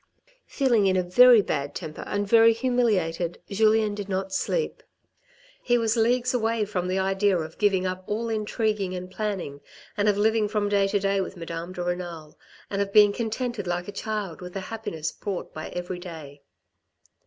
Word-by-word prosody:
Feeling 240 -8 +2
in 185 -1 +2
a 185 - +2
very 235 +5 +7
bad 145 -4 -3
temper 155 -1 -6
and 205 0 -1
very 230 +1 +6
humiliated, 210 -9 0
Julien 215 +1 +3
did 205 -1 -6
not 190 0 -2
sleep. - - -1 0.8
He 240 -1 +2
was 225 -1 +1
leagues 245 +2 +2
away 225 -2 +1
from 180 -3 -3
the 185 +1 -1
idea 195 0 +2
of 160 -1 -6
giving 195 -3 +2
up 185 0 -3
all 220 +3 -2
intriguing 215 -3 -1
and 180 0 -7
planning, 190 -9 -4 0.3
and 210 0 +2
of 205 - +1
living 220 0 +2
from 205 -1 -1
day 200 -1 +3
to 205 +1 +1
day 195 0 +1
with 190 0 -6
Madame 170 +1 -6
de 180 - -4
Renal, 175 -3 -5 0.3
and 200 0 -2
of 200 0 -2
being 205 -1 +6
contented 230 -2 -3
like 175 0 -2
a - - -5
child 205 -6 -4
with 180 0 -8
the 195 - -4
happiness 165 -9 -4
brought 195 -3 -5
by 155 - -6
every 180 0 -5
day. 155 -5 -10
200 Hz, 180 wpm, -25 LUFS, 180-220 Hz, 0.8 s, very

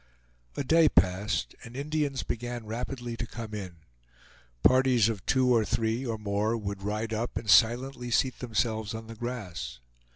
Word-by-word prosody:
A - - 0
day 160 +2 +5
passed, 90 +2 +1
and 115 +1 -11
Indians 145 -2 -1
began 120 0 -4
rapidly 120 +2 -4
to 120 - -4
come 110 -1 -7
in. 95 -4 -5 0.9
Parties 130 -3 +5
of 105 -5 -4
two 130 -2 +4
or 115 -2 +4
three 115 +2 0
or 115 -4 -2
more 105 +2 0
would 100 -2 -5
ride 105 +3 -2
up 115 +2 -2
and 110 - -5
silently 120 +3 +4
seat 130 +2 +1
themselves 110 -3 -1
on 110 0 -7
the 115 - -9
grass. 115 - -5
115 Hz, 160 wpm, -29 LUFS, 105-125 Hz, 0.9 s, day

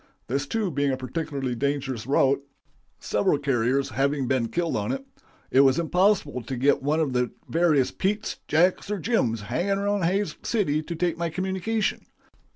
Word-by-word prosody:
This 140 +3 -2
too 215 -2 -1
being 145 -1 +1
a 130 - -1
particularly 135 -1 -3
dangerous 135 -2 -2
route 140 0 +3 0.6
several 105 +7 +1
couriers 135 0 +1
having 140 0 0
been 125 -2 +1
killed 170 +5 -1
on - - -1
it 270 0 -4 0.5
it 130 - +4
was 135 -1 +5
impossible 175 -5 +2
to 125 +3 -5
get 135 +4 +2
one 150 +4 +1
of 150 -5 0
the 125 -1 +1 0.2
various 160 -6 +2
Petes, 210 +3 -2
Jacks, 180 +5 +2
or 210 - -1
Jims 140 - 0
hanging 185 - -1
around 200 -2 0
Hays 195 +4 0
City 170 -10 0
to 170 +2 -6
take 170 0 -1
my 170 -1 0
communication. 190 +5 -2
150 Hz, 165 wpm, -25 LUFS, 135-185 Hz, 0.6 s, was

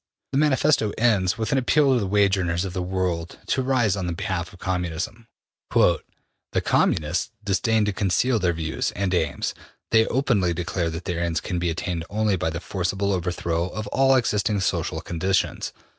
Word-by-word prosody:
The 135 - +1
Manifesto 145 -6 +3
ends 100 -5 +2
with 110 -1 -2
an 135 - +3
appeal 140 +2 +3
to 125 - +3
the 100 - -1
wage 100 0 +3
earners 85 -1 -1
of 95 - -5
the 95 - -2
world 90 -2 -2
to 130 - 0
rise 125 -6 +2
on 90 -3 -2
behalf 85 0 -3
of 95 - -14
Communism. 90 +5 -3 0.4
``The - - +4 0.6
Communists 80 +6 +1
disdain 105 +2 +2
to 105 - -1
conceal 110 +6 +1
their 90 -2 +2
views 80 -1 -2
and 95 -1 -1
aims. 80 -5 0 0.4
They 110 -1 +5
openly 105 -10 +1
declare 90 0 -1
that 80 +1 -6
their 85 -2 -2
ends 85 -1 0
can 90 - -3
be 85 0 0
attained 85 0 -3
only 105 -1 +1
by 90 -2 -1
the 85 +1 -4
forcible 95 +2 -1
overthrow 85 -1 -1
of 110 +2 -5
all 135 0 +4
existing 105 -4 +1
social - - -1
conditions. 95 +3 -1
95 Hz, 175 wpm, -24 LUFS, 85-110 Hz, 0.6 s, They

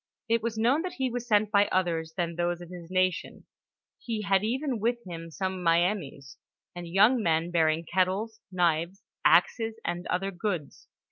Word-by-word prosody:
It 230 0 +2
was 225 0 -3
known 245 +8 +3
that 365 +1 -4
he 260 -2 -2
was 245 0 -4
sent 210 -2 +3
by 205 -1 +4
others 165 -3 -1
than 170 -2 -1
those 175 0 -1
of 175 0 -11
his 175 -2 -9
nation; 185 -1 -1 0.5
he 225 -3 -4
had 195 -1 +2
even 255 +2 -1
with 235 +3 +1
him 165 -2 -7
some 185 +2 -3
Miamis, 165 -5 0 0.4
and 175 -1 -6
young 210 +8 +4
men 165 -2 +1
bearing 160 -1 +2
kettles, 190 +6 0
knives, 175 +1 0 0.2
axes, 225 +8 +3
and 175 +1 -3
other 195 +2 -1
goods. 175 -6 -4
185 Hz, 165 wpm, -28 LUFS, 170-220 Hz, 0.5 s, by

